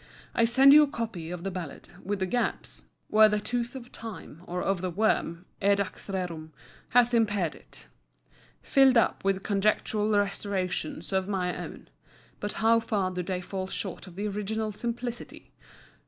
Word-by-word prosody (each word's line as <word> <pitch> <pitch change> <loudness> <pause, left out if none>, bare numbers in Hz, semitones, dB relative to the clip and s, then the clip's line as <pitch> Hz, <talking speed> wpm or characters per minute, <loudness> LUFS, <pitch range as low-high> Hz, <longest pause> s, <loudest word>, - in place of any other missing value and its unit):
I 230 - +3
send 265 +4 +7
you 300 - +10
a 300 - +4
copy 225 - -5
of 175 -1 -6
the 195 - -2
Ballad, 175 -5 -7
with 205 +2 -2
the 190 - -1
gaps 240 +6 -2 0.2
(where 215 0 +6
the 210 0 +1
tooth 240 +3 -2
of 245 -2 -9
time 190 -7 -9
or 180 +1 -3
of 195 -2 0
the 185 - -1
worm, 180 -2 0 0.2
edax 200 -1 0
rerum, 175 -5 -4 0.4
hath 245 0 +4
impaired 205 -7 +2
it) - - -14 0.8
filled 270 -2 +5
up 230 - +2
with 195 -1 0
conjectural 210 +1 +1
restorations 195 -4 -1
of 190 0 +1
my 185 -3 -1
own. - - -8 0.5
But 205 - -3
how 230 +1 +4
far 205 -5 -1
do 180 0 -3
they 180 0 -3
fall 185 +1 -4
short 190 0 -5
of 175 - -12
the 205 +2 -2
original 210 +2 -2
simplicity! 240 +2 -5
200 Hz, 165 wpm, -28 LUFS, 185-225 Hz, 0.8 s, you